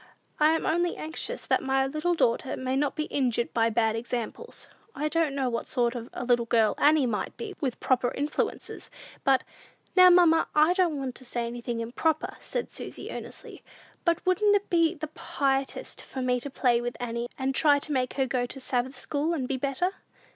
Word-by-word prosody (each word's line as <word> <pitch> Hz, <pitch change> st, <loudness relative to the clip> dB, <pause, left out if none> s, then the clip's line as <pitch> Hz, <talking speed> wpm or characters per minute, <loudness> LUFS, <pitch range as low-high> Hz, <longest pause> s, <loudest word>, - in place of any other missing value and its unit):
I 305 Hz, +1 st, +5 dB
am 325 Hz, -, -1 dB
only 345 Hz, +2 st, +1 dB
anxious 330 Hz, +10 st, -3 dB
that -, -, +2 dB
my 265 Hz, 0 st, +1 dB
little 305 Hz, +6 st, 0 dB
daughter 250 Hz, -2 st, +1 dB
may 260 Hz, 0 st, -2 dB
not 285 Hz, +1 st, 0 dB
be 305 Hz, -, -1 dB
injured 245 Hz, -6 st, -1 dB
by 230 Hz, -1 st, +3 dB
bad 225 Hz, -1 st, +1 dB
examples. 240 Hz, -, -5 dB, 0.3 s
I 300 Hz, -, -1 dB
don't 310 Hz, -3 st, +1 dB
know 270 Hz, -2 st, 0 dB
what 235 Hz, -1 st, -2 dB
sort 240 Hz, -1 st, +1 dB
of 240 Hz, -1 st, -6 dB
a -, -, -5 dB
little 240 Hz, -1 st, +2 dB
girl 225 Hz, -2 st, +3 dB
Annie 295 Hz, -2 st, +5 dB
might 220 Hz, -4 st, -3 dB
be 440 Hz, -4 st, -6 dB
with 260 Hz, -5 st, -2 dB
proper 250 Hz, -1 st, +2 dB
influences, 290 Hz, +2 st, -3 dB, 0.3 s
but 265 Hz, -1 st, +3 dB, 0.3 s
" -, -, -37 dB
"Now, 365 Hz, -1 st, +9 dB
mamma, 345 Hz, -2 st, +5 dB
I 305 Hz, +3 st, +5 dB
don't 355 Hz, -5 st, +1 dB
want 265 Hz, -2 st, -3 dB
to -, -, -12 dB
say 240 Hz, -1 st, -2 dB
anything 235 Hz, 0 st, -4 dB
improper," 300 Hz, +7 st, -1 dB
said -, -, -4 dB
Susy, -, -, -6 dB
earnestly; -, -, -8 dB, 0.4 s
"but 340 Hz, -1 st, +1 dB
wouldn't 410 Hz, +3 st, +4 dB
it 405 Hz, 0 st, -1 dB
be 335 Hz, 0 st, +3 dB
the 310 Hz, 0 st, -5 dB
piousest 270 Hz, -3 st, -2 dB
for 260 Hz, -, -6 dB
me 250 Hz, 0 st, +1 dB
to 285 Hz, -, -6 dB
play 245 Hz, -3 st, +2 dB
with 240 Hz, 0 st, -4 dB
Annie, 235 Hz, 0 st, -3 dB
and 270 Hz, 0 st, -1 dB
try 290 Hz, +1 st, +4 dB
to 290 Hz, +2 st, -5 dB
make 255 Hz, -3 st, 0 dB
her 270 Hz, -, +2 dB
go 245 Hz, -1 st, -1 dB
to 270 Hz, -, -8 dB
Sabbath 255 Hz, 0 st, -2 dB
school, 310 Hz, +3 st, -1 dB
and 260 Hz, -5 st, -2 dB
be 270 Hz, -, -1 dB
better?" 280 Hz, +7 st, 0 dB
270 Hz, 200 wpm, -27 LUFS, 245-315 Hz, 0.4 s, Now